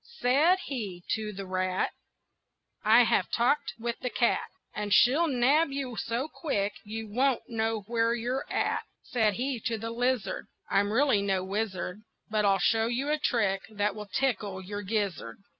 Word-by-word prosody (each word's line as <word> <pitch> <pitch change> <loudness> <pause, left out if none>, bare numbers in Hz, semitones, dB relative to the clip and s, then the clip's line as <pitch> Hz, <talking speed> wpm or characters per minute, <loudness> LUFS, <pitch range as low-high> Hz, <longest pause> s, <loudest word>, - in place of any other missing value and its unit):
Said 300 - +4
he 200 -10 -5
to 215 -1 -1
the 195 -1 -7
rat: 185 0 -1 0.9
"I 225 +3 +7
have - - +2
talked 245 +5 +1
with 235 0 -3
the 250 - -2
cat; 235 - +1 0.2
And 210 -1 -4
she'll 275 - +5
nab 280 +4 +3
you 270 -3 -4
so 235 +5 -2
quick 210 -11 -2
you 220 +1 -6
won't 255 +5 +1
know 225 -1 -1
where 230 +2 +1
you're 245 +3 -3
at." - - 0 0.2
Said 220 -5 +1
he 255 +1 -2
to 225 +1 -2
the 225 +2 -5
lizard: 240 -5 -1 0.2
"I'm 205 +1 +2
really 255 -3 +3
no 195 -2 0
wizard, 195 -1 -3 0.3
But 215 -1 +2
I'll 195 -1 +4
show 225 +4 +2
you 260 +5 -1
a 305 - +1
trick 205 -8 +1
that 205 -1 0
will 210 0 -8
tickle 205 -4 -1
your 205 +2 -5
gizzard." 195 - -2
225 Hz, 165 wpm, -29 LUFS, 200-250 Hz, 0.9 s, I